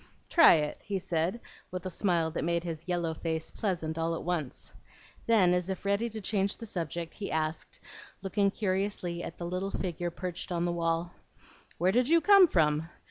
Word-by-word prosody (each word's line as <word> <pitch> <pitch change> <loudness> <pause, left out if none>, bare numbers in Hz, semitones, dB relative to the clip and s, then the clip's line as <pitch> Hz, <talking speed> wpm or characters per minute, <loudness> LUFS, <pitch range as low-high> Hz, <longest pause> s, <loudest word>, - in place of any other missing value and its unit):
"Try 330 - +8
it," 150 -2 -1
he 200 -2 -3
said, 175 +4 -1 0.3
with 185 0 -6
a 185 - -3
smile 170 -3 +1
that 160 - -3
made 170 +1 0
his 165 -1 -6
yellow 170 -2 0
face 160 0 -3
pleasant 165 -6 -2
all 165 0 0
at - - -5
once. 170 -7 -3 0.5
Then, 200 -6 +5
as 180 +1 0
if 190 +1 -4
ready 200 +4 +1
to 220 0 -6
change 200 0 0
the 230 - -8
subject, 170 -4 -4
he 205 - -5
asked, 155 0 -2 0.4
looking 200 +1 +2
curiously 190 -3 -2
at 170 - -7
the 170 - -5
little 185 +3 -2
figure 175 -3 -3
perched 180 +1 -6
on 175 0 0
the 175 - 0
wall, 170 0 -1 0.7
"Where 180 +3 +3
did 250 +5 +2
you 335 +1 +6
come 395 0 +7
from? 155 - +2
175 Hz, 190 wpm, -30 LUFS, 165-195 Hz, 0.7 s, Try